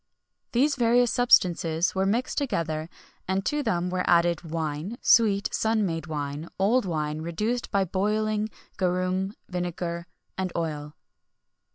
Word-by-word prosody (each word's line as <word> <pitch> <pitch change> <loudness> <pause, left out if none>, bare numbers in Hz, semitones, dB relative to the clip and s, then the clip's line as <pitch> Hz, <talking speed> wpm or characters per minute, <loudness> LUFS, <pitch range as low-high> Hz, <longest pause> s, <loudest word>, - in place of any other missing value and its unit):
These 280 +4 +2
various 240 0 +4
substances 175 -8 +3
were 190 0 +1
mixed 235 +6 0
together, 165 - -2 0.4
and 190 +1 0
to 295 0 0
them 180 -8 -1
were 180 0 0
added 170 -1 +4
wine, 160 +5 -4
sweet 200 -3 +4
sun 220 -1 +1
made 165 -3 -3
wine, 150 +1 -4
old 220 +6 +3
wine 155 -3 -2
reduced 210 +9 -2
by 200 -1 +2
boiling, 210 +3 0 0.3
garum, 185 +1 0
vinegar, 175 -1 -4 0.3
and 185 -1 -1
oil. 150 -3 -3
185 Hz, 130 wpm, -26 LUFS, 165-215 Hz, 0.4 s, various